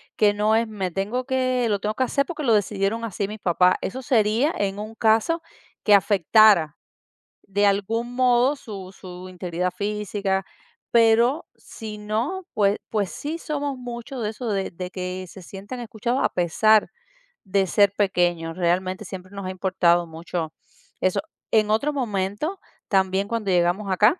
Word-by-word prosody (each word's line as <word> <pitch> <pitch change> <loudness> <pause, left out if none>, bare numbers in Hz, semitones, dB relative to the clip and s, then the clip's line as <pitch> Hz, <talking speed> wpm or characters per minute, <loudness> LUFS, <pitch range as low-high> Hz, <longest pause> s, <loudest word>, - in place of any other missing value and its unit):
que 210 -1 +4
no 210 +1 +2
es: 225 0 +1
"Me 195 -4 -3
tengo 205 +8 -2
que 255 -2 +1
lo 205 -2 0
tengo 210 +2 -2
que 260 - +1
hacer 280 +2 +1
porque 310 0 -5
lo 235 -5 +3
decidieron 205 +2 0
así 205 -3 -2
mis 215 +2 -7
papás". 180 0 +3
Eso 260 +7 -4
sería 235 +4 +2
en 200 0 -1
un 215 +1 -7
caso 225 +10 +2 0.4
que 210 - +5
afectara 200 -4 +5 0.7
de 205 +1 +1
algún 225 +4 0
modo 250 +2 +3
su 200 -9 -9
su 185 -1 -10
integridad 180 0 -3
física, 200 -2 -2 0.5
pero 235 +6 +4
si 215 -2 -9
no, 230 - -2
pues 205 -1 +2
pues 205 -4 0
sí 315 +3 -4
somos 290 -4 -3
mucho 245 +2 -7
de 215 -2 -1
eso 225 +2 -5
de 195 -2 -1
de 180 +1 -7
que 185 0 -4
se 190 - -12
sienten 200 +7 -8
escuchados 235 +2 -2
a - - +3
pesar 210 +5 +3 0.6
de 195 0 +2
ser 200 +1 +4
pequeños, 175 -4 +1
realmente 185 +3 0
siempre 185 0 -9
nos 200 -1 -6
ha - - -3
importado 180 -2 +2
mucho 165 0 -5 0.5
eso. 185 - +1 0.3
En 215 -1 +3
otro 280 +8 +1
momento, 225 - -2 0.3
también 190 0 +2
cuando 225 -4 -1
llegamos 180 +3 +1
acá, 210 - +4
210 Hz, 160 wpm, -24 LUFS, 185-230 Hz, 0.7 s, que